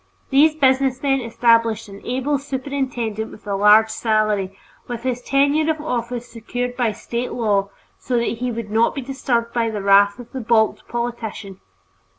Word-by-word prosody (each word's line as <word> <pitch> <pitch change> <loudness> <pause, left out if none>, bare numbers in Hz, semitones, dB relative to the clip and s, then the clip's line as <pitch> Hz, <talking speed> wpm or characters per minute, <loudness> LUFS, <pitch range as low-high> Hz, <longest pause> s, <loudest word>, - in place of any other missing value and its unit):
These 300 +3 +5
businessmen 270 -1 +2
established 230 -2 +2
an 200 0 -11
able 265 +3 -1
superintendent 260 -5 -3
with 215 - -14
a 200 -1 -2
large 210 +2 +5
salary, 215 -4 0 0.3
with 240 -1 -5
his 250 -1 -2
tenure 285 +4 +2
of 315 - -4
office 245 -4 -3
secured 245 +2 -5
by 240 -3 +1
State 235 +3 -4
law 205 -4 0 0.3
so 250 - -1
that 235 -1 -1
he 250 0 -1
would 225 -2 -6
not 225 +2 +2
be 275 - -3
disturbed 245 -3 -2
by 230 -1 +1
the 210 -3 -4
wrath 200 +1 +5
of 245 -2 -12
the 265 - -5
balked 220 -1 +1
politician. 235 -5 -5
235 Hz, 160 wpm, -21 LUFS, 220-260 Hz, 0.3 s, These